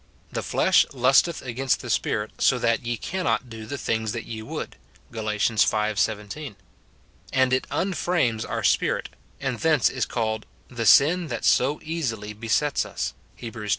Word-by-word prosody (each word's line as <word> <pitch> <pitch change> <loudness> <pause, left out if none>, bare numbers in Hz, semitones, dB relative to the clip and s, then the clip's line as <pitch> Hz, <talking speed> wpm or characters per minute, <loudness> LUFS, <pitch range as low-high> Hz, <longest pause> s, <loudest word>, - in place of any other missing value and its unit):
" - - -33
The - - -2
flesh - - +4
lusteth 135 +6 +3
against 130 +1 -1
the - - -8
Spirit, 105 0 0
so 130 - +4
that 115 +1 +1
ye 120 0 -2
cannot 170 - -2
do 110 -1 -8
the 140 - -4
things 110 -3 -1
that 115 - -5
ye 110 -1 -6
would," 110 - -6 0.4
Gal. 110 -2 -4
v. 105 0 -1 0.6
17. 105 +5 -2 0.8
And 130 -1 +3
it 130 - 0
unframes 175 - 0
our - - -3
spirit, - - +1 0.3
and 135 -4 -2
thence 155 -5 +3
is - - -1
called 110 -2 -2
" - - -34
The 115 -3 -2
sin 165 - +6
that 120 -4 -4
so 140 +4 +3
easily 115 -11 -3
besets 115 +7 0
us," - - -4 0.2
Heb, 115 -2 -7
xii. 110 -3 -6
120 Hz, 170 wpm, -25 LUFS, 110-140 Hz, 0.8 s, sin